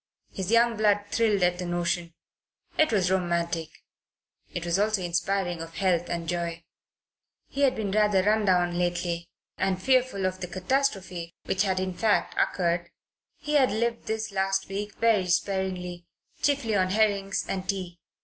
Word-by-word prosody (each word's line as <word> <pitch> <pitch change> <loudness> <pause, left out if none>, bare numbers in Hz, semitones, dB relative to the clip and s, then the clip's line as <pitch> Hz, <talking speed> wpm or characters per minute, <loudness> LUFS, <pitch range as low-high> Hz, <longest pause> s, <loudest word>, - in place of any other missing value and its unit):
His 190 -1 -4
young 230 0 +4
blood 205 -1 +3
thrilled 215 -4 +2
at 180 0 +2
the 180 - -3
notion. 175 -1 -1 0.6
It 310 -4 +3
was 190 -4 +2
romantic. 170 -3 0 0.8
It 175 - -4
was 170 +2 +1
also 210 -2 +1
inspiring 175 0 -1
of 165 0 -8
health 180 -3 +1
and 170 -1 -3
joy. 170 -1 -3 0.9
He 280 - -4
had 270 -2 +4
been 205 -3 -2
rather 210 -2 +3
run 215 +1 +2
down 175 -2 +2
lately, 175 -1 -1 0.3
and, 190 -1 +1
fearful 255 -3 +2
of 185 0 -1
the 180 - -3
catastrophe 185 -4 -1
which 190 - 0
had 190 -2 +1
in 185 0 -2
fact 210 +3 +1
occurred, 170 -1 0 0.5
he 300 - -4
had 275 -3 +5
lived 230 +2 -1
this 220 0 -2
last 195 0 0
week 205 +1 -4
very 220 -5 +2
sparingly 180 -1 -1 0.3
chiefly 275 -7 +1
on 185 -1 +2
herrings 200 -1 +1
and 185 -1 -4
tea. 180 -3 -3
190 Hz, 160 wpm, -27 LUFS, 175-210 Hz, 0.9 s, had